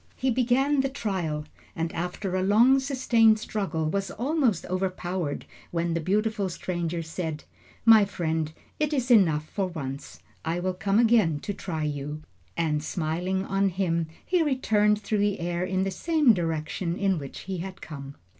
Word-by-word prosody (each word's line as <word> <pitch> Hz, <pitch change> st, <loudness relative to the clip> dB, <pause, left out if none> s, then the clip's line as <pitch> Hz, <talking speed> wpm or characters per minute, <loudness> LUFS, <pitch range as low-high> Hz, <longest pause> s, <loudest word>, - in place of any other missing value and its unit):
He 260 Hz, 0 st, 0 dB
began 260 Hz, +4 st, +2 dB
the 270 Hz, -, -1 dB
trial, 180 Hz, -, -2 dB, 0.3 s
and 165 Hz, 0 st, -2 dB
after 180 Hz, +3 st, -3 dB
a 185 Hz, -, +1 dB
long 230 Hz, +8 st, +5 dB
sustained 245 Hz, -5 st, +3 dB
struggle, 195 Hz, -7 st, -2 dB
was 195 Hz, +4 st, -1 dB
almost 255 Hz, -, 0 dB
overpowered, 185 Hz, -4 st, -2 dB, 0.2 s
when 170 Hz, 0 st, -1 dB
the 170 Hz, -, 0 dB
beautiful 205 Hz, +3 st, 0 dB
stranger 170 Hz, -1 st, -3 dB
said: 160 Hz, -1 st, -4 dB, 0.4 s
"My 220 Hz, -3 st, +8 dB
friend, 160 Hz, -4 st, -2 dB, 0.3 s
it 300 Hz, 0 st, +1 dB
is 255 Hz, -3 st, 0 dB
enough 160 Hz, -9 st, +4 dB
for 195 Hz, +2 st, -2 dB
once; 140 Hz, -6 st, -7 dB, 0.2 s
I 165 Hz, +2 st, -1 dB
will 185 Hz, +1 st, -1 dB
come 195 Hz, +2 st, 0 dB
again 220 Hz, -10 st, +4 dB
to 205 Hz, -, -3 dB
try 165 Hz, -5 st, -4 dB
you," 150 Hz, +1 st, -4 dB, 0.3 s
and 150 Hz, -3 st, 0 dB
smiling 180 Hz, +4 st, -1 dB
on 195 Hz, 0 st, +1 dB
him, 170 Hz, -3 st, 0 dB, 0.2 s
he 360 Hz, -2 st, +2 dB
returned 215 Hz, -8 st, +2 dB
through 210 Hz, 0 st, -1 dB
the 205 Hz, 0 st, +1 dB
air 175 Hz, +1 st, -2 dB
in 185 Hz, +1 st, 0 dB
the 195 Hz, -, -1 dB
same 310 Hz, -, +3 dB
direction 165 Hz, 0 st, -2 dB
in 195 Hz, -4 st, +1 dB
which 140 Hz, -2 st, -8 dB
he 190 Hz, -1 st, -5 dB
had 190 Hz, +2 st, -6 dB
come. 140 Hz, -2 st, -8 dB
185 Hz, 165 wpm, -27 LUFS, 165-215 Hz, 0.4 s, My